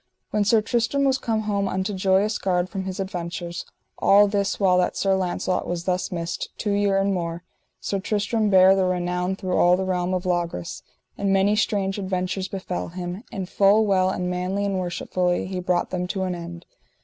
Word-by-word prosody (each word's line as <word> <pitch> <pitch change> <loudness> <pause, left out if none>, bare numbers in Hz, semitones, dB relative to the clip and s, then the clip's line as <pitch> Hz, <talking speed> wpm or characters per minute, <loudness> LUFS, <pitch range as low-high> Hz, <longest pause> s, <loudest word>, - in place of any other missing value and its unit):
When 210 -1 +2
Sir 215 +1 +3
Tristram 240 +5 0
was 265 -1 +2
come 220 -2 -1
home 200 -2 -1
unto 190 +2 -2
Joyous 195 +3 +2
Gard 180 -1 0
from 190 -1 -4
his 190 +1 -5
adventures, 175 -2 -5 0.3
all 205 +1 +6
this 200 -1 -1
while 185 -2 +4
that 180 - 0
Sir 195 -1 +2
Launcelot 185 0 -1
was 175 -1 -3
thus 180 0 -1
missed, 170 -1 -4
two 210 - -2
year 200 -1 +2
and 195 0 +1
more, 170 -1 -3 0.4
Sir 200 - -2
Tristram 210 +2 0
bare 190 0 +7
the 190 - +2
renown 180 +1 -1
through 185 -2 -3
all 180 +1 +5
the 190 - -2
realm 185 0 0
of 180 0 -3
Logris, 175 - -2 0.4
and 200 -1 +1
many 195 +2 +3
strange 200 -2 0
adventures 185 0 -2
befell 190 -2 -4
him, 180 +3 -6
and 195 -5 -4
full 205 +3 +4
well 185 -2 +3
and 180 -1 -2
manly 180 +3 -1
and 195 -2 -1
worshipfully 180 0 -1
he 185 0 -4
brought 180 -1 0
them 180 -1 -2
to 190 +1 -2
an 185 -1 -1
end. 170 0 -8
190 Hz, 195 wpm, -24 LUFS, 180-200 Hz, 0.4 s, bare